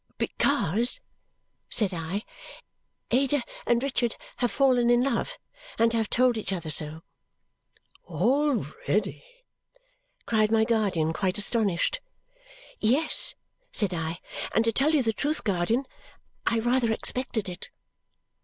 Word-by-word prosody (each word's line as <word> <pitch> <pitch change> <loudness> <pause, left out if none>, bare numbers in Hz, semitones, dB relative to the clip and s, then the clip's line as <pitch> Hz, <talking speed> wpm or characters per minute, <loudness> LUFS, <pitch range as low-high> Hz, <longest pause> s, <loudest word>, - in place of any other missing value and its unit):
"Because," 235 - +1 0.7
said 205 -5 +2
I, 175 +5 -3 0.9
"Ada 270 +2 +2 0.2
and 240 +1 +2
Richard 250 -4 0 0.2
have 245 - +1
fallen 250 -3 +3
in 240 0 +4
love. 275 - -1 0.4
And 230 0 +3
have 225 -2 0
told 250 -1 +3
each 210 -3 -4
other 170 -4 -3
so." 155 +2 0 1.0
"Already!" 230 - 0 1.0
cried 215 -1 +2
my 220 -1 +4
guardian, 195 -9 +1
quite 185 +2 -1
astonished. 210 - +1 0.8
"Yes!" 265 +9 +3 0.4
said 200 -4 +1
I. 165 0 -3 0.4
"And 225 - +3
to 230 - +3
tell 290 +7 +2
you 280 - +3
the 225 -1 0
truth, 295 +8 -1
guardian, 205 +6 0 0.6
I 230 - +3
rather 240 0 +2
expected 225 -1 -1
it." 180 0 -7
225 Hz, 115 wpm, -27 LUFS, 195-250 Hz, 1.0 s, in